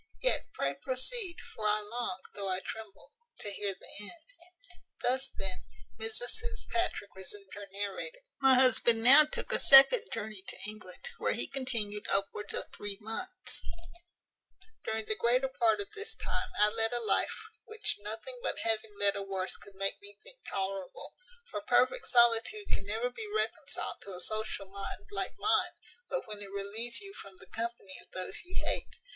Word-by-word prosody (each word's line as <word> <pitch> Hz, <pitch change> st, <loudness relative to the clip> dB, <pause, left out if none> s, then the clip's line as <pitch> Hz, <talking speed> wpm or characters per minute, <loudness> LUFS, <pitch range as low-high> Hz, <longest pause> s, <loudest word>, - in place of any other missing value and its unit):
Yet -, -, +2 dB
pray -, -, 0 dB
proceed; 340 Hz, -, +1 dB, 0.2 s
for 215 Hz, -1 st, -2 dB
I 210 Hz, 0 st, +3 dB
long, 240 Hz, +4 st, -4 dB
though 200 Hz, -1 st, -2 dB
I 185 Hz, 0 st, +1 dB
tremble, 220 Hz, -3 st, -8 dB, 0.3 s
to 205 Hz, -, -3 dB
hear 200 Hz, -1 st, -2 dB
the -, -, -12 dB
end." 330 Hz, -, -6 dB, 0.7 s
Thus, 260 Hz, +2 st, +2 dB
then, 190 Hz, -1 st, -3 dB, 0.4 s
Mrs 455 Hz, +1 st, +2 dB
Fitzpatrick 370 Hz, -, -2 dB
resumed 190 Hz, +1 st, -2 dB
her 205 Hz, -1 st, -8 dB
narrative: 205 Hz, -, -5 dB, 0.2 s
"My 265 Hz, -1 st, +6 dB
husband 240 Hz, -3 st, +6 dB
now 280 Hz, +5 st, +10 dB
took 300 Hz, -, -4 dB
a -, -, +4 dB
second 275 Hz, -, +9 dB
journey 215 Hz, -3 st, -5 dB
to -, -, -4 dB
England, 210 Hz, -, -7 dB
where -, -, +1 dB
he -, -, 0 dB
continued 230 Hz, -6 st, -2 dB
upwards 200 Hz, +1 st, +2 dB
of -, -, -1 dB
three 205 Hz, -1 st, -4 dB
months; 370 Hz, -, -3 dB, 1.2 s
during 220 Hz, 0 st, -2 dB
the 215 Hz, -, 0 dB
greater 250 Hz, +4 st, +2 dB
part 335 Hz, +7 st, +2 dB
of 405 Hz, 0 st, -5 dB
this 430 Hz, +1 st, -3 dB
time -, -, -3 dB
I 210 Hz, +1 st, +5 dB
led 225 Hz, +2 st, +1 dB
a 240 Hz, -, +2 dB
life -, -, +2 dB, 0.3 s
which 440 Hz, -1 st, 0 dB
nothing 220 Hz, -, -6 dB
but -, -, -2 dB
having 220 Hz, -2 st, -1 dB
led 200 Hz, -1 st, +4 dB
a 200 Hz, -, -3 dB
worse 190 Hz, -1 st, -3 dB
could 200 Hz, -, -13 dB
make 195 Hz, -, -2 dB
me 405 Hz, 0 st, -12 dB
think -, -, -14 dB
tolerable; 195 Hz, -1 st, -4 dB, 0.4 s
for -, -, -4 dB
perfect -, -, +2 dB
solitude 240 Hz, -, +4 dB
can 195 Hz, -, -2 dB
never 225 Hz, +4 st, -1 dB
be 435 Hz, -, -7 dB
reconciled 430 Hz, +1 st, -2 dB
to 195 Hz, -2 st, -6 dB
a -, -, -5 dB
social 215 Hz, +1 st, 0 dB
mind, 200 Hz, -, -8 dB
like -, -, -2 dB
mine, -, -, +2 dB, 0.4 s
but -, -, -2 dB
when 210 Hz, -1 st, -6 dB
it 200 Hz, -, -5 dB
relieves 200 Hz, +4 st, -2 dB
you 395 Hz, -1 st, -9 dB
from 195 Hz, -, -11 dB
the 190 Hz, -, -13 dB
company 225 Hz, -2 st, -5 dB
of -, -, -20 dB
those 185 Hz, 0 st, -3 dB
you 360 Hz, +1 st, -4 dB
hate. -, -, -2 dB
225 Hz, 175 wpm, -31 LUFS, 200-340 Hz, 1.2 s, now